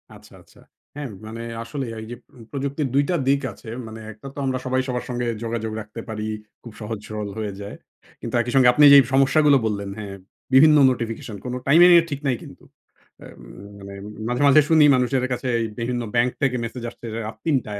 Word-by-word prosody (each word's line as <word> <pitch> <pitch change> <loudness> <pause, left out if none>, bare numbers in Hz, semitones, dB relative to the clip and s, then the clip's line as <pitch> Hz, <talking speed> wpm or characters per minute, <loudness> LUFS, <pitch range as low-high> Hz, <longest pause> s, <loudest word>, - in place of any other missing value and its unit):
আচ্ছা, - - -17
আচ্ছা। - - -22 0.4
হ্যাঁ, 145 -4 -5 0.2
মানে 115 +1 -7 0.2
আসলে 135 +3 -5
এইযে 115 +2 -7 0.2
উম 115 - -13
প্রযুক্তির 140 +1 -2
২ 140 - +4
টা 180 - +1
দিক 140 0 +3
আছে। 110 - -16 0.2
মানে 110 0 -9
একটা 110 +6 -12
তো - - -19
আমরা 130 -1 -1
সবাই 130 0 +1
সবার 125 -1 -3
সঙ্গে 120 0 -2 0.2
যোগাযোগ 115 -1 -3
রাখতে 110 +2 -9
পারি। 105 -1 -4 0.4
খুব 115 -3 -11
সহজ-সরল 105 -1 -5
হয়ে 105 -2 -3
যায়। 100 +1 -7 0.5
কিন্তু 115 +1 -4
একই 120 +1 -4
সঙ্গে 130 -2 +6
আপনি 150 - +4
যেই 140 - +10
সমস্যাগুলো 140 +1 +4
বললেন 100 -2 -2
হ্যাঁ, 100 -2 -7 0.4
বিভিন্ন 150 +3 +7
নোটিফিকেশন 115 -3 -4
কোন 125 - -4
টাইমিংয়ের 170 +3 +7
ঠিক 140 - -4
নাই 125 - +2
কিন্তু। - - -14 0.6
অ্যা - - -12
উম - - -13 0.3
মানে 100 0 -10 0.3
মাঝে, 125 +2 -1
মাঝে 145 +2 +7
শুনি 160 -2 +6
মানুষের 125 +1 0
কাছে, 125 +1 -2 0.3
বিভিন্ন 120 +1 -2
ব্যাংক 120 +1 +3
থেকে 135 -2 +1
মেসেজ 120 +1 -6
আসছে 120 - -14
রা - - -3
রাত 110 - -7
৩ 160 - +2
টায়, 105 -1 -6
125 Hz, 195 wpm, -22 LUFS, 110-140 Hz, 0.6 s, যেই